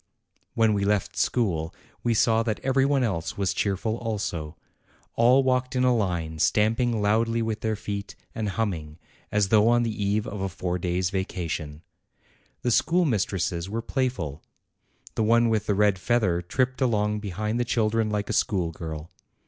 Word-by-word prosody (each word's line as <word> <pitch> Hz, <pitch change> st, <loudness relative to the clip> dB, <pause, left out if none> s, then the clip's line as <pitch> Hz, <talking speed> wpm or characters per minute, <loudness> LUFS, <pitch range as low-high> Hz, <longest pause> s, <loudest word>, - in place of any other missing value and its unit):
When 110 Hz, -2 st, +3 dB
we 100 Hz, -1 st, 0 dB
left 100 Hz, -1 st, 0 dB
school, 85 Hz, -10 st, 0 dB, 0.3 s
we 120 Hz, -1 st, +1 dB
saw 115 Hz, +1 st, +3 dB
that 110 Hz, -2 st, -2 dB
every 135 Hz, 0 st, +2 dB
one 140 Hz, -2 st, +2 dB
else 95 Hz, -8 st, -2 dB
was 100 Hz, -2 st, 0 dB
cheerful 105 Hz, +3 st, -1 dB
also. 85 Hz, -9 st, -4 dB, 0.6 s
All 125 Hz, +4 st, +5 dB
walked 130 Hz, 0 st, 0 dB
in 125 Hz, -, +2 dB
a 125 Hz, -1 st, +4 dB
line, 85 Hz, -7 st, -2 dB
stamping 110 Hz, +4 st, +2 dB
loudly 115 Hz, +2 st, +2 dB
with 110 Hz, -1 st, -3 dB
their 110 Hz, -1 st, 0 dB
feet, 100 Hz, 0 st, -5 dB, 0.2 s
and 110 Hz, -2 st, -2 dB
humming, 85 Hz, -8 st, -3 dB, 0.3 s
as 105 Hz, -2 st, +2 dB
though 110 Hz, 0 st, +5 dB
on 120 Hz, 0 st, +4 dB
the 115 Hz, -, -1 dB
eve 105 Hz, 0 st, 0 dB
of 100 Hz, -1 st, -5 dB
a 95 Hz, -, -1 dB
four 90 Hz, 0 st, -3 dB
days' 90 Hz, +1 st, -1 dB
vacation, 85 Hz, -5 st, -4 dB, 0.8 s
The 120 Hz, -, +1 dB
schoolmistresses 105 Hz, -, +1 dB
were 115 Hz, +2 st, -3 dB
playful; 95 Hz, -, -2 dB, 0.7 s
the 110 Hz, -, 0 dB
one 115 Hz, +2 st, +4 dB
with 110 Hz, -2 st, 0 dB
the 105 Hz, -, +2 dB
red 100 Hz, -2 st, +3 dB
feather 95 Hz, -5 st, +1 dB
tripped 130 Hz, +9 st, -1 dB
along 105 Hz, -4 st, +1 dB
behind 105 Hz, +3 st, -3 dB
the -, -, +2 dB
children 115 Hz, -2 st, +1 dB
like 105 Hz, -1 st, -2 dB
a -, -, -2 dB
schoolgirl. 85 Hz, -6 st, -2 dB
105 Hz, 165 wpm, -26 LUFS, 95-115 Hz, 0.8 s, All